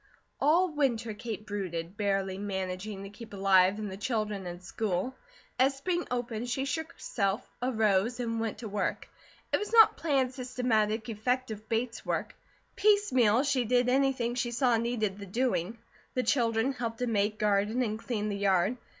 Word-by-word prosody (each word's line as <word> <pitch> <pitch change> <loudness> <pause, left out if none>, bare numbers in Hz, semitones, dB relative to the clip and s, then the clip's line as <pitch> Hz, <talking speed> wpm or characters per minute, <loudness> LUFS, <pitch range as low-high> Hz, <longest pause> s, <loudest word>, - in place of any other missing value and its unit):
All 330 +4 +3
winter 240 -6 0
Kate 215 -1 -6
brooded, 185 -4 -4
barely 195 -2 -1
managing 195 0 -4
to 195 - -7
keep 220 0 -11
alive, 190 0 +4
and 210 -2 -4
the 190 - -6
children 210 -4 -2
in 175 0 -6
school. 190 +4 -2 0.5
As 270 +1 +3
spring 345 +5 -1
opened, 240 -1 -3
she 265 +2 -1
shook 320 +3 -3
herself, 200 -2 -2
arose, 225 -2 +1
and 230 -2 -1
went 225 -1 -2
to 225 0 -6
work. 205 -1 -2 0.5
It - - +4
was 420 0 -4
not 450 -1 +7
planned, 270 -5 +1
systematic, 240 -4 0
effective, 225 -1 -2
Bates 230 +1 -1
work. - - -2 0.4
Piecemeal 265 - +4
she 275 -3 +1
did 245 +2 +2
anything 260 -2 +2
she 240 -1 -1
saw 245 0 +2
needed 220 -4 -1
the 200 - -8
doing. 230 -1 -1 0.4
The 255 - +1
children 230 -1 +2
helped 230 -3 -4
to 250 - -1
make 210 -2 +1
garden 210 +4 +2
and 215 -2 -2
clean 215 -3 -2
the 205 - -2
yard. 200 +3 +2
225 Hz, 165 wpm, -30 LUFS, 205-255 Hz, 0.5 s, not